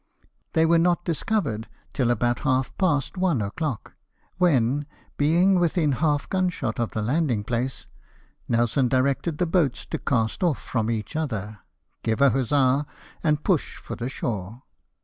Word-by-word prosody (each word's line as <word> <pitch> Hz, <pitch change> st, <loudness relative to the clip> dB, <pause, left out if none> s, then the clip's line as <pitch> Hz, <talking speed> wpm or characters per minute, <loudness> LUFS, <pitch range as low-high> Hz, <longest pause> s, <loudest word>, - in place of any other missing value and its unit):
They 160 Hz, -, +4 dB
were 165 Hz, +1 st, +4 dB
not 175 Hz, +1 st, +2 dB
discovered 160 Hz, -, -1 dB, 0.3 s
till 125 Hz, -3 st, +1 dB
about 120 Hz, 0 st, +1 dB
half 130 Hz, -3 st, 0 dB
past 165 Hz, -3 st, +1 dB
one 180 Hz, -8 st, +2 dB
o'clock, 115 Hz, +4 st, -3 dB, 0.5 s
when, 145 Hz, -4 st, +2 dB, 0.3 s
being 175 Hz, +6 st, +3 dB
within 170 Hz, -3 st, +2 dB
half 145 Hz, +1 st, +1 dB
gun 185 Hz, -1 st, +1 dB
shot 120 Hz, -11 st, -4 dB
of 120 Hz, -, 0 dB
the 110 Hz, -, -3 dB
landing 125 Hz, -3 st, +1 dB
place, 125 Hz, +4 st, -2 dB, 0.6 s
Nelson 120 Hz, +3 st, +2 dB
directed 140 Hz, +5 st, +1 dB
the 180 Hz, -, +1 dB
boats 160 Hz, -6 st, +1 dB
to -, -, -4 dB
cast 115 Hz, -4 st, 0 dB
off 170 Hz, -7 st, +2 dB
from 115 Hz, -2 st, -2 dB
each 115 Hz, +5 st, -3 dB
other, 110 Hz, -9 st, -3 dB, 0.4 s
give 110 Hz, -1 st, -1 dB
a 140 Hz, -1 st, +6 dB
huzza, 135 Hz, +3 st, +2 dB, 0.4 s
and 150 Hz, -2 st, +1 dB
push 180 Hz, -7 st, 0 dB
for -, -, -7 dB
the 120 Hz, +2 st, -4 dB
shore. 115 Hz, -2 st, -4 dB
135 Hz, 150 wpm, -25 LUFS, 120-165 Hz, 0.6 s, a